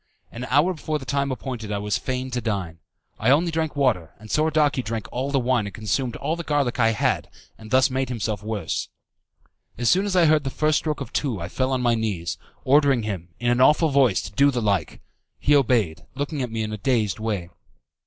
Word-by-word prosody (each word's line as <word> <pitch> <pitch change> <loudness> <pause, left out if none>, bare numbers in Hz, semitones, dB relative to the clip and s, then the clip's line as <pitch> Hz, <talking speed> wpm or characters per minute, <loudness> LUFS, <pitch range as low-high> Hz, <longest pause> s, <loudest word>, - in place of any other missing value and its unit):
An 120 +2 -6
hour 145 +9 +3
before 155 -1 -3
the 135 - -9
time 140 +1 0
appointed 125 -5 -5
I 100 - -1
was 105 0 -1
fain 130 0 -3
to 125 0 -2
dine. 95 -7 -3 0.4
I 110 - +2
only 165 +5 +4
drank 160 -2 -2
water, 110 - +1
and 110 +1 -11
Soradaci 150 -3 +2
drank 110 -1 -4
all 130 +3 -2
the 140 -1 +1
wine 120 -4 +1
and 100 - -8
consumed 115 +3 -1
all 160 - -2
the 170 - -5
garlic 145 -6 0
I 115 -1 +5
had, 105 - 0 0.3
and 110 -1 -13
thus 130 +3 +4
made 130 0 -1
himself 110 -4 -2
worse. 105 -5 -3 0.9
As 120 -1 +2
soon 190 +3 +3
as 195 - -1
I 175 -2 +5
heard 155 -1 +4
the 135 - -2
first 155 +3 +1
stroke 155 -2 -3
of - - -7
two 125 -9 -1
I 85 - -5
fell 130 0 -1
on 130 -1 0
my 120 -1 +3
knees, 90 -8 -2 0.2
ordering 140 -3 +4
him, 95 -5 -4
in 120 0 +1
an 120 +1 +2
awful 150 +4 +5
voice, 135 -9 +3
to 95 - -7
do 140 +7 +4
the 125 -3 -1
like. 100 -8 -1 0.4
He 145 - +3
obeyed, 115 - +2
looking 145 +1 -3
at 125 - -2
me 110 0 -2
in 110 0 -4
a - - -3
dazed 110 -6 0
way. 100 -6 -3
125 Hz, 220 wpm, -24 LUFS, 110-140 Hz, 0.9 s, I